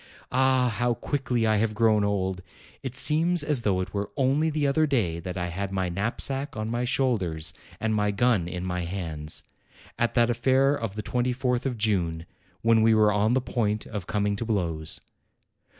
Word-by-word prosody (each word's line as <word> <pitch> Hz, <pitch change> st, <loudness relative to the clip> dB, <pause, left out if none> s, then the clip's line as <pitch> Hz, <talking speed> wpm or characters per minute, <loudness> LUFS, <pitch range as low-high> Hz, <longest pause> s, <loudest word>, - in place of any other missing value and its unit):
Ah, 130 Hz, -1 st, +3 dB
how 120 Hz, -1 st, +2 dB
quickly 125 Hz, -5 st, -1 dB
I 110 Hz, -1 st, +3 dB
have 110 Hz, 0 st, 0 dB
grown 110 Hz, -2 st, +3 dB
old! 95 Hz, -2 st, -1 dB, 0.4 s
It 130 Hz, -2 st, -5 dB
seems 155 Hz, +5 st, +4 dB
as 145 Hz, -4 st, +1 dB
though 95 Hz, -4 st, +1 dB
it 95 Hz, -, -6 dB
were 100 Hz, 0 st, -2 dB
only 140 Hz, +4 st, +2 dB
the 150 Hz, -1 st, -1 dB
other 155 Hz, +3 st, +2 dB
day 100 Hz, -, 0 dB
that 90 Hz, +1 st, -6 dB
I 90 Hz, -1 st, -2 dB
had 95 Hz, +3 st, -4 dB
my 95 Hz, -2 st, -1 dB
knapsack 120 Hz, -, -2 dB
on 110 Hz, +1 st, -3 dB
my 120 Hz, +1 st, -1 dB
shoulders 95 Hz, -, 0 dB, 0.3 s
and 110 Hz, 0 st, 0 dB
my 105 Hz, -1 st, +1 dB
gun 100 Hz, -3 st, +2 dB
in 90 Hz, +1 st, -5 dB
my 90 Hz, -1 st, -2 dB
hands, 80 Hz, -4 st, -3 dB, 0.6 s
at 120 Hz, -, 0 dB
that 120 Hz, -1 st, +4 dB
affair 135 Hz, +3 st, +3 dB
of 115 Hz, -8 st, -4 dB
the 105 Hz, -, -4 dB
24th 125 Hz, +1 st, 0 dB
of 125 Hz, -3 st, -3 dB
June, 90 Hz, -7 st, 0 dB, 0.4 s
when 115 Hz, -1 st, +4 dB
we 110 Hz, 0 st, +5 dB
were 105 Hz, -1 st, +4 dB
on 105 Hz, +4 st, +2 dB
the 130 Hz, -, +2 dB
point 110 Hz, -3 st, -1 dB
of 100 Hz, -5 st, -6 dB
coming 105 Hz, -1 st, 0 dB
to 115 Hz, -, -3 dB
blows. 85 Hz, -8 st, -1 dB
110 Hz, 185 wpm, -26 LUFS, 95-125 Hz, 0.6 s, we